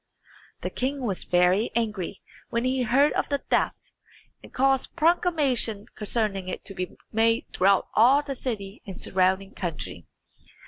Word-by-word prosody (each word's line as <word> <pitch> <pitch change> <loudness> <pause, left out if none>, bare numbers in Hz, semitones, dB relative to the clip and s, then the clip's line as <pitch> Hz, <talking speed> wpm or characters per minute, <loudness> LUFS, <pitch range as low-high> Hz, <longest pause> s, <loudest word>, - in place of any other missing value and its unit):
The - - -3
king 270 +1 -2
was 200 -6 -2
very 180 +5 +3
angry 210 -5 -2 0.3
when 235 +1 -1
he 260 0 +1
heard 260 +5 +3
of - - -1
the 285 - +1
theft, - - 0 0.7
and - - -14
caused 270 0 +1
proclamation 305 - +2
concerning 210 -3 -2
it 185 - -5
to 195 - -4
be 185 -1 -5
made 225 +1 +2
throughout 195 +1 +3
all 260 +6 +5
the 280 - -4
city 215 -6 -5
and 190 - -7
surrounding 190 +1 +1
country. 145 - -5
225 Hz, 145 wpm, -26 LUFS, 195-260 Hz, 0.7 s, all